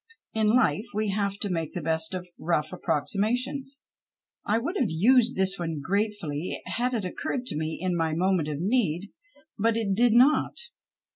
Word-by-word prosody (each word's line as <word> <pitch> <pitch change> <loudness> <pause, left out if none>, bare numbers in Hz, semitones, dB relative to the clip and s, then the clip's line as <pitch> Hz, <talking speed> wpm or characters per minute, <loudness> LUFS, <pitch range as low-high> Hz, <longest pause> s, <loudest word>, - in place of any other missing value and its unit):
In 220 0 +3
life 235 -3 +2
we 215 0 0
have 200 0 -1
to 205 - -2
make 165 -3 -2
the 175 - -3
best 160 +2 0
of 180 -1 -5
rough 155 -1 0
approximations. 245 - -1 0.6
I 215 - +1
would 280 - -2
have 240 - +1
used 235 +9 +4
this 190 0 0
one 165 -3 -3
gratefully 185 -3 -2
had 250 +2 -1
it 215 -5 -2
occurred 245 +7 -3
to 250 - -4
me 155 +1 -2
in 185 -1 -1
my 160 -2 0
moment 180 -2 +1
of 150 -2 -3
need. 195 -2 0 0.5
But 225 +2 +2
it 210 -4 0
did 235 +3 +4
not. 255 +6 +4
195 Hz, 170 wpm, -27 LUFS, 165-230 Hz, 0.6 s, used